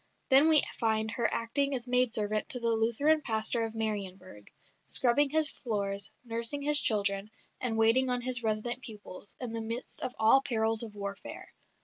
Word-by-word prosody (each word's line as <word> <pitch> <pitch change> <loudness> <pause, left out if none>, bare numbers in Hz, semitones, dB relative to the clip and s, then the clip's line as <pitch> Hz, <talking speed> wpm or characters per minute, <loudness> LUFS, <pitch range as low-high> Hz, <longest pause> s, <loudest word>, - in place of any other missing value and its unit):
Then 275 +4 +6
we 310 -2 +9 0.2
find 220 -1 0
her 235 -1 -1
acting 275 +4 0
as 245 -2 -5
maid 250 -1 +2
servant 215 +3 -2
to 260 -5 0
the 235 -1 0
Lutheran 235 +8 +1
pastor 225 -1 -1
of 225 0 -8
Marienburg, 190 - -5 0.4
scrubbing 270 +3 +2
his 315 +1 0
floors, 200 -4 -3 0.2
nursing 235 +5 -4
his 295 0 +4
children, 200 -1 0 0.3
and 230 -3 -2
waiting 230 +4 +3
on 250 0 0
his 250 0 -2
resident 225 +3 -2
pupils, 205 -4 -10
in 245 -3 -6
the 230 - -3
midst 230 +3 -5
of 255 - -4
all 220 +4 +5
the - - -8
perils 225 -2 0
of 220 -3 -8
warfare. 200 -1 -8
230 Hz, 175 wpm, -30 LUFS, 215-255 Hz, 0.4 s, we